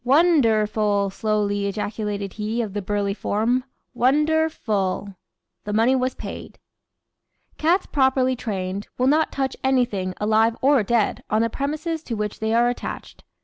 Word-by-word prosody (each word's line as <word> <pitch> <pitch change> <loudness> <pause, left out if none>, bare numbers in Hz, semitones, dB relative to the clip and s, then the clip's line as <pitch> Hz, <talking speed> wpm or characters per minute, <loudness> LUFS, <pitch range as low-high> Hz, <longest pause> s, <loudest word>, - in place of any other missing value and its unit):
"Won 310 +5 +5
der 220 -3 +3
ful!" 205 -2 0
slowly 205 -1 0
ejaculated 205 -1 -3
he 220 +2 -2
of 205 -4 -6
the 205 - -2
burly 200 0 -1
form; 230 +5 0 0.3
"Wonder 300 +6 +2
ful!" 200 -6 -2 0.5
The 210 - -4
money 230 +5 +3
was 255 0 0
paid. - - -8 1.0
Cats, 345 +5 +2
properly 265 -2 +2
trained, 200 -4 -4
will 250 - +1
not 305 +4 +3
touch 265 -1 -2
anything, 240 -9 +1
alive 220 +2 +2
or 275 -1 +4
dead, 220 +1 0
on 215 +1 +2
the 230 - -1
premises 310 +5 -3
to 235 - -3
which 210 -1 -3
they 220 0 -1
are 235 +1 +4
attached. 245 - -5
225 Hz, 150 wpm, -23 LUFS, 205-265 Hz, 1.0 s, Won